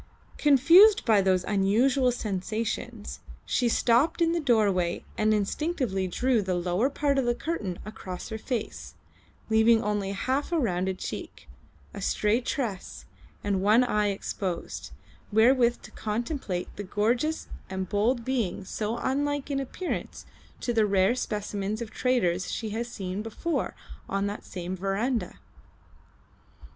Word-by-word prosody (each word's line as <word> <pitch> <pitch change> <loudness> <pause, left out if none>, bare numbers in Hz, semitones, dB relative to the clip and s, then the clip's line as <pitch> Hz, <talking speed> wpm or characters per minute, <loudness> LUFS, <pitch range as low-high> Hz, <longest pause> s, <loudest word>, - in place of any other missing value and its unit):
Confused 330 - +7
by 215 -4 +5
those 185 -1 +2
unusual 235 +6 +3
sensations 220 +1 -3 0.3
she 245 - +1
stopped 240 +9 +3
in 335 -1 +3
the 340 - +1
doorway 205 - +2
and 215 0 +2
instinctively 215 - 0
drew 245 +5 +1
the 185 -2 -1
lower 180 +8 +1
part 280 -1 +1
of 265 - 0
the 240 0 +1
curtain 220 - -3
across 190 -4 -7
her 220 -1 -5
face, 235 -2 -4 0.5
leaving 220 +1 +4
only 205 -2 -1
half 260 - -1
a 340 - +2
rounded 190 - 0
cheek, - - -7 0.5
a - - -7
stray 215 +4 +1
tress, 235 -7 -4 0.4
and 200 -2 0
one 215 +5 +5
eye 210 -4 +1
exposed, 195 -3 -4 0.4
wherewith 240 +2 +4
to - - -11
contemplate 215 - -3
the 205 - -4
gorgeous 235 +11 0 0.2
and 190 0 -3
bold 225 +5 +1
being 225 -8 -1
so 215 +4 -3
unlike 285 +2 -1
in 275 - 0
appearance 305 +7 -4 0.4
to 240 - -1
the 220 -2 +3
rare 195 +2 +3
specimens 210 -3 -3
of 230 -2 -6
traders 195 -8 +1
she 220 -2 -3
had 230 +3 -2
seen 195 -4 -4
before 225 +10 -2 0.3
on 195 0 0
that 205 +1 -4
same 180 0 -5
verandah. 195 +3 -1
220 Hz, 135 wpm, -27 LUFS, 195-255 Hz, 0.5 s, Confused